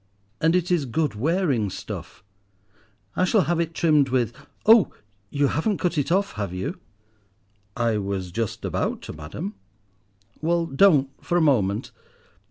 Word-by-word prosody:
"And 165 +2 +3
it 180 0 0
is 160 -6 +1
good 150 +5 0
wearing 140 - +1
stuff. 95 - -8 0.9
I - - +2
shall 195 +3 +4
have 175 -1 0
it 165 -1 -2
trimmed 150 -5 +3
with— 125 -3 +1 0.3
Oh! 220 -3 +7 0.4
you 140 +3 +1
haven't 195 +6 0
cut 180 -1 -1
it 145 +1 0
off, 200 +2 +2
have 100 -4 -4
you?" 140 - -4 1.0
"I 115 -3 +1
was 95 -2 -3
just 115 +3 -3
about - - -2
to, - - -7
madam." 80 +7 -6 0.9
"Well, 170 +1 +1
don't 140 -3 +4
for 175 - +1
a - - +3
moment. 105 -10 +1
145 Hz, 150 wpm, -24 LUFS, 110-175 Hz, 1.0 s, Oh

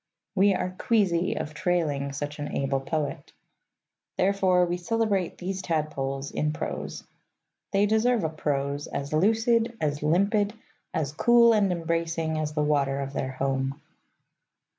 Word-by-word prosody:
We 200 0 +4
are 180 0 -2
queasy 185 -6 +2
of 155 - -4
trailing 155 -5 0
such 145 +2 -5
an 145 - -4
able 135 0 0
poet. 150 +2 -3 0.8
Therefore 185 -2 +3
we 175 0 -2
celebrate 200 -1 0
these 190 +1 -4
tadpoles 140 -5 -2
in 150 0 -1
prose. - - -5 0.7
They 200 0 +3
deserve 220 +1 +2
a 160 - +1
prose 145 -2 -2
as 140 +1 -4
lucid, 225 +6 +2
as 145 -1 -1
limpid, 200 +7 +2 0.4
as 145 -3 -1
cool 235 +5 +5
and 205 -3 +3
embracing, 165 -2 -1
as 150 -1 -2
the 150 0 +1
water 140 -2 +1
of 135 0 -4
their 130 -1 -3
home. 135 +1 -1
165 Hz, 140 wpm, -27 LUFS, 145-195 Hz, 0.8 s, cool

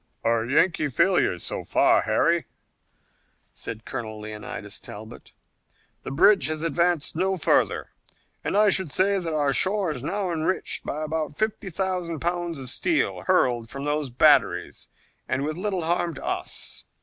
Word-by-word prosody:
"A 115 -1 +2
Yankee 155 +3 +2
failure 170 - +2
so - - -2
far, - - +4
Harry," - - +2 1.1
said 115 0 -7
Colonel 110 -4 -5
Leonidas 105 0 -6
Talbot. 110 +2 -11 0.7
"The - - -7
bridge 160 +2 +5
has 155 0 -2
advanced 165 0 +1
no 190 +3 +1
further, 160 - +1 0.5
and - - 0
I 210 -1 +5
should 190 -7 +2
say 195 +4 +3
that 170 -3 -3
our 145 -2 +2
shore 190 0 +1
is 130 -5 -5
now 190 +5 -2
enriched 165 +3 -1
by 155 +2 -3
about 155 -1 -3
fifty 215 -2 -2
thousand 180 -3 -2
pounds 175 -1 -2
of 130 -2 -4
steel 335 - 0
hurled 125 -11 +2
from 140 0 -6
those 145 -1 -1
batteries 120 - +3 0.4
and 130 +1 -1
with 155 +1 -2
little 190 -1 -2
harm 170 0 0
to - - -8
us." - - -4
160 Hz, 150 wpm, -25 LUFS, 135-185 Hz, 1.1 s, bridge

